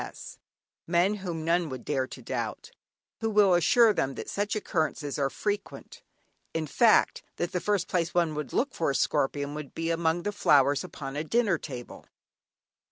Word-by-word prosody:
C. - - -3
S., - - -11 0.5
(men 175 +4 +3
whom 170 -5 -5
none 170 0 +1
would 130 -2 -7
dare 135 -3 0
to - - -11
doubt), - - -4 0.5
who 225 - -1
will 205 -3 +5
assure 220 +6 +5
them 135 -7 -1
that - - -6
such 205 +1 -1
occurrences 155 -7 -2
are 135 -1 +1
frequent; 205 +6 -5 0.5
in 160 -1 -1
fact 220 +8 +3
that 175 - -2
the 180 - -2
first 205 -4 0
place 170 -2 0
one 170 -3 +1
would 150 0 -5
look 265 +1 0
for 165 - 0
a 140 - -1
scorpion 140 +2 0
would 150 -2 -8
be 165 0 -1
among 165 +1 0
the 205 - -1
flowers 145 -7 +3
upon 140 -6 -7
a 150 - -2
dinner 200 -1 +1
table! 125 -5 -9
165 Hz, 180 wpm, -28 LUFS, 145-200 Hz, 0.5 s, will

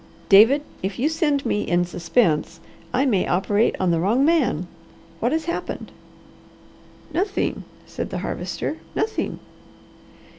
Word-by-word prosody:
"David, 225 +9 +7 0.2
if 190 +1 -3
you 265 - +1
send 300 -4 0
me 210 - 0
in 175 -2 +1
suspense, 170 -1 0 0.3
I 265 +3 +2
may 210 -9 +2
operate 205 +5 +2
on 185 -2 +2
the 165 - +2
wrong 225 +10 +2
man. 295 - +2 0.5
What 240 - +1
has 315 0 0
happened?" 340 - -4 1.2
"Nothing!" 390 +5 -1 0.2
said - - -5
the - - -4
Harvester. - - -3 0.2
"Nothing!" 440 - -1
235 Hz, 125 wpm, -23 LUFS, 185-295 Hz, 1.2 s, David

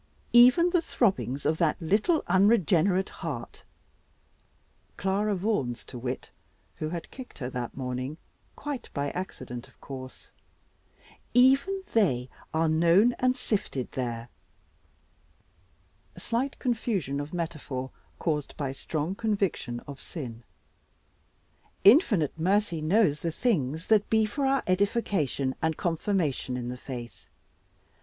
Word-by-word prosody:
Even 255 +9 +7
the 350 -2 +3
throbbings 190 - 0
of 155 +2 +1
that 165 -3 +2
little 210 - +2
unregenerate 190 -1 +3
heart" 140 -8 -6 1.4
Clara 200 +2 +1
Vaughan's 175 - -1
to 125 - -8
wit, 125 +1 -4 0.5
who 155 - -3
had 170 0 -6
kicked 260 -1 -10
her 125 -3 -4
that 125 -1 -5
morning, 130 +3 -3 0.4
quite 285 -4 -5
by 140 -1 -1
accident 125 -9 -6
of - - -25
course 130 -1 -9 1.0
"even 275 +10 +4
they 130 - +2 0.2
are 160 +1 +2
known 170 +9 +4
and 255 +1 +2
sifted 195 - -2
there" 120 -2 -4 1.9
slight 255 +4 -2
confusion 215 - -1
of 145 +1 -5
metaphor 150 -6 -4 0.3
caused 150 -4 -2
by 140 -3 -2
strong 155 +5 -3
conviction 195 - -1
of 140 -1 -10
sin 120 -8 -7 1.4
"Infinite 200 - +5
mercy 185 -1 +1
knows 155 -2 +3
the 170 - -2
things 160 - 0
that 215 -2 +3
be 220 -1 +4
for 270 +6 -1
our 270 0 +2
edification, 185 - +1
and 160 -1 0
confirmation 165 -7 -1
in 120 -1 -4
the 125 - -4
faith. 120 - -8
165 Hz, 120 wpm, -28 LUFS, 135-215 Hz, 1.9 s, Even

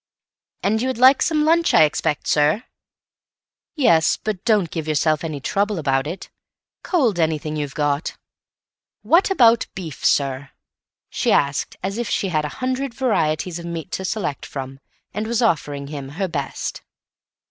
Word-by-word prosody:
"And 220 +3 +1
you 255 - 0
would 260 - -2
like 260 +3 +6
some 305 -2 +2
lunch, 335 +1 +3
I - - +8
expect, 150 0 0
sir." 150 +10 +2 1.1
"Yes, 165 - +3
but 210 -3 -4
don't 210 -8 +2
give 160 -2 -4
yourself 155 0 +1
any 155 -3 -4
trouble 200 +8 -1
about 135 -3 0
it. 175 +5 -7 0.5
Cold 250 - +1
anything 155 -1 0
you've 145 -3 -4
got." 145 +1 -1 0.9
"What 345 +5 +4
about 235 -10 +4
beef, 165 -6 -7
sir?" 135 0 +1 0.6
she - - 0
asked, 140 0 +1
as 195 +4 -3
if 240 - -2
she 195 - 0
had 155 -3 0
a - - -3 0.2
hundred 260 -1 -2
varieties 175 -9 0
of 170 - -8
meat 170 +1 -6
to 190 - -3
select 185 -7 -3
from, 135 -1 -7 0.3
and 215 +2 -3
was 235 +1 0
offering 145 -8 0
him 140 -2 -7
her 195 -1 0
best. 145 -6 -4
170 Hz, 160 wpm, -21 LUFS, 150-225 Hz, 1.1 s, I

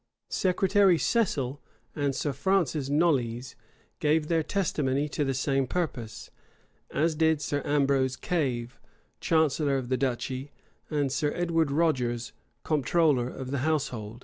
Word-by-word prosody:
Secretary 190 0 +3
Cecil 145 - 0 0.3
and 145 -3 0
Sir 140 +2 -1
Francis 160 -6 0
Knollys 130 -6 +1 0.4
gave 150 +1 +2
their 165 -1 +2
testimony 150 -6 0
to 145 - -1
the 135 -2 -1
same 135 +1 0
purpose; 120 -10 -4 0.6
as 160 +3 +1
did 160 0 +3
also 145 0 -2
Sir - - -3
Ambrose 135 -2 +2
Cave, 125 -8 -2 0.4
chancellor 150 -3 +2
of 125 -2 -4
the 130 - +1
duchy, 130 +1 -3 0.4
and 145 -3 0
Sir 145 +2 0
Edward 165 -3 +1
Rogers, 130 -6 0 0.3
comptroller 150 -3 +2
of 130 0 -7
the 140 - -1
household. 130 -7 -2
145 Hz, 130 wpm, -28 LUFS, 130-160 Hz, 0.6 s, Secretary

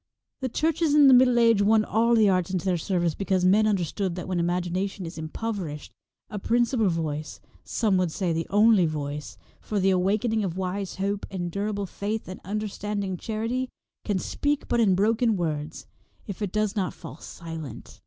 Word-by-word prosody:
The 260 - -2
churches 315 +3 +1
in 290 -2 +7
the 265 - +8
Middle 250 -1 +6
Age 230 -3 +5
won 215 +1 +4
all 230 +2 +2
the 220 -2 +5
arts 185 -2 +2
into 185 0 -2
their 185 -2 +2
service 175 -1 0
because 190 -1 0
men 210 +4 +5
understood 190 -2 -1
that 180 - -6
when 185 -2 -1
imagination 180 +2 -1
is 165 0 -7
impoverished, 160 -2 -5 0.4
a 210 -2 -5
principal 235 0 +2
voice 155 -3 -3 0.2
— - - -36
some 210 -5 +1
would 180 -3 +1
say 175 0 -1
the 165 +1 -2
only 205 -3 +5
voice 150 -1 -5
— - - -32
for 210 - -2
the 190 0 +3
awaken 200 +5 +1
ing 220 -1 +1
of 180 -2 -3
wise 190 +1 -3
hope 200 +1 -2
and 175 -3 -4
durable 200 +1 -2
faith, 210 +3 -4
and 185 - -8
understanding 205 -1 -3
charity, 225 +6 -3 0.3
can 205 -3 0
speak 290 +9 -1
but 240 - +1
in 200 -5 +4
broken 220 +2 +2
words, 155 -2 -3 0.4
if 200 0 -7
it 200 -3 -2
does 215 0 0
not 190 -3 -1
fall 165 -2 -10
silent. 165 -4 -9
195 Hz, 190 wpm, -26 LUFS, 175-220 Hz, 0.4 s, the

